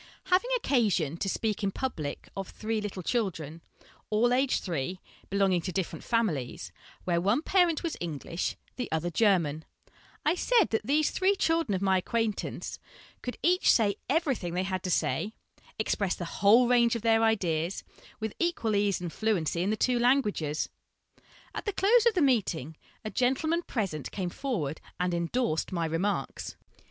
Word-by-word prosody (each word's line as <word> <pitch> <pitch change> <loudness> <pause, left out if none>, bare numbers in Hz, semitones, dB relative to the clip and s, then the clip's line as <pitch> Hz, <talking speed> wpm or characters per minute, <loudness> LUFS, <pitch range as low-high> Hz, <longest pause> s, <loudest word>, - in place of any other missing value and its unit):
Having 380 +7 +3
occasion 205 - +1
to 195 - -1
speak 215 +2 -1
in 200 - +2
public 175 - -4
of 195 -1 -5
three 220 0 -3
little 195 -3 -5
children, 165 - -2 0.5
all 235 +3 +3
aged 265 +1 +2
three, 175 0 -3 0.3
belonging 195 -2 +2
to 185 - -4
different 190 -2 -3
families, 180 - -1 0.3
where 170 -1 +1
one 205 - +2
parent 350 -4 +3
was 335 - -2
English, 170 +1 -3 0.2
the 250 - -4
other 160 +2 -1
German, 165 -6 +2 0.6
I 305 - +4
said 445 +2 +3
that 220 - +1
these 300 +2 +3
three 385 +2 +2
children 325 - +1
of 190 - -2
my 190 -1 +3
acquaintance 225 +2 -2 0.4
could 245 - -5
each 360 +2 +4
say 205 -4 +3
everything 270 - 0
they 185 - +1
had 185 -1 -2
to - - -1
say, 210 +4 0 0.4
express 200 -3 0
the 175 - -5
whole 210 +8 +4
range 235 -1 +4
of 230 - -4
their 225 -1 +4
ideas, 180 -6 +1 0.4
with 220 -1 -3
equal 335 -11 0
ease 200 -2 +1
and 175 -2 -5
fluency 180 -7 0
in 190 - 0
the 215 - 0
two 245 +2 +2
languages. 210 - +1 0.9
At - - -5
the 415 - -1
close 445 +5 +4
of 455 - +3
the 350 - +3
meeting, 180 - +1 0.3
a 215 - -3
gentleman 290 +7 +1
present 195 - -3
came 180 -3 -3
forward 165 - -3 0.2
and 180 0 0
endorsed 170 +1 -1
my 170 -3 -1
remarks. 165 +6 -2
210 Hz, 165 wpm, -29 LUFS, 175-250 Hz, 0.9 s, I